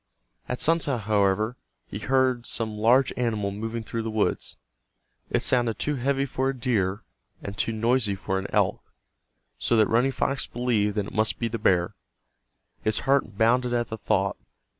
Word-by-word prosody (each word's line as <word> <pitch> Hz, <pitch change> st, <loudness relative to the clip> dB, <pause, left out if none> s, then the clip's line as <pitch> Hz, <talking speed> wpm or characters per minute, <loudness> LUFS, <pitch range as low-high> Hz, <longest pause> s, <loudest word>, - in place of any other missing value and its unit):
At 125 Hz, -, -2 dB
sunset, 150 Hz, -7 st, +2 dB
however, 105 Hz, +2 st, +1 dB, 0.3 s
he 100 Hz, -, -7 dB
heard 130 Hz, 0 st, +1 dB
some 110 Hz, -2 st, -2 dB
large 120 Hz, +5 st, +3 dB
animal 110 Hz, -5 st, -1 dB
moving 115 Hz, +3 st, -4 dB
through 115 Hz, +1 st, -4 dB
the 115 Hz, -, -3 dB
woods. 110 Hz, -1 st, -1 dB, 0.7 s
It -, -, 0 dB
sounded 120 Hz, -3 st, +1 dB
too 150 Hz, -, -1 dB
heavy 135 Hz, +1 st, 0 dB
for 130 Hz, 0 st, -1 dB
a 135 Hz, -, -3 dB
deer, 110 Hz, -4 st, 0 dB, 0.4 s
and 100 Hz, -, -6 dB
too 115 Hz, -, 0 dB
noisy 115 Hz, -1 st, +1 dB
for 95 Hz, 0 st, -2 dB
an 95 Hz, -, -5 dB
elk, -, -, +1 dB, 0.8 s
so -, -, +1 dB
that 110 Hz, -, +6 dB
Running 120 Hz, +6 st, +2 dB
Fox 135 Hz, 0 st, -1 dB
believed 110 Hz, -4 st, 0 dB
it 105 Hz, -1 st, -2 dB
must 110 Hz, 0 st, +1 dB
be 115 Hz, -, -1 dB
the 115 Hz, 0 st, -4 dB
bear. 90 Hz, -4 st, +2 dB, 0.9 s
His 110 Hz, 0 st, 0 dB
heart 135 Hz, -6 st, +1 dB
bounded 120 Hz, +2 st, +3 dB
at 120 Hz, 0 st, -1 dB
the 110 Hz, -, -5 dB
thought. 100 Hz, -2 st, 0 dB
115 Hz, 165 wpm, -26 LUFS, 105-125 Hz, 0.9 s, that